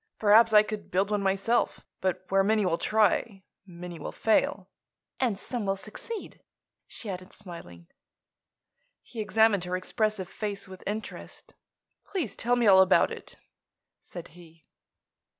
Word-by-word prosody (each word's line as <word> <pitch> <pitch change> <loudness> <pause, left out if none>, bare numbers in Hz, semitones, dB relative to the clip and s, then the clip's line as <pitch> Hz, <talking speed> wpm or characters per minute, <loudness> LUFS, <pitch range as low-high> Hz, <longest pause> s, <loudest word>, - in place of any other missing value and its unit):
Perhaps 220 +2 +6
I 210 -1 +7
could 215 -1 -6
build 195 +3 0
one 205 -1 +1
myself. 195 +5 0
But 185 0 -2
where 195 0 +3
many 215 0 +2
will 170 -2 0
try, 215 -2 +1 0.2
many 175 -1 -9
will - - -5
fail." 200 -3 +1 0.5
"And 240 -6 +1
some 240 +2 -4
will 195 -1 0
succeed," 300 - -8 0.5
she 230 - -9
added, 185 -1 -6
smiling. 165 - -11 1.2
He 235 - -10
examined 215 -3 +3
her 180 +1 -2
expressive 215 0 -1
face 200 0 -5
with 185 0 -11
interest. 215 +2 -7 0.5
"Please 325 - -3
tell 245 +1 +1
me 240 -1 +1
all 190 -2 +8
about 190 0 +4
it," - - -9 0.6
said 175 -2 -10
he. 165 -2 -17
200 Hz, 140 wpm, -28 LUFS, 185-220 Hz, 1.2 s, all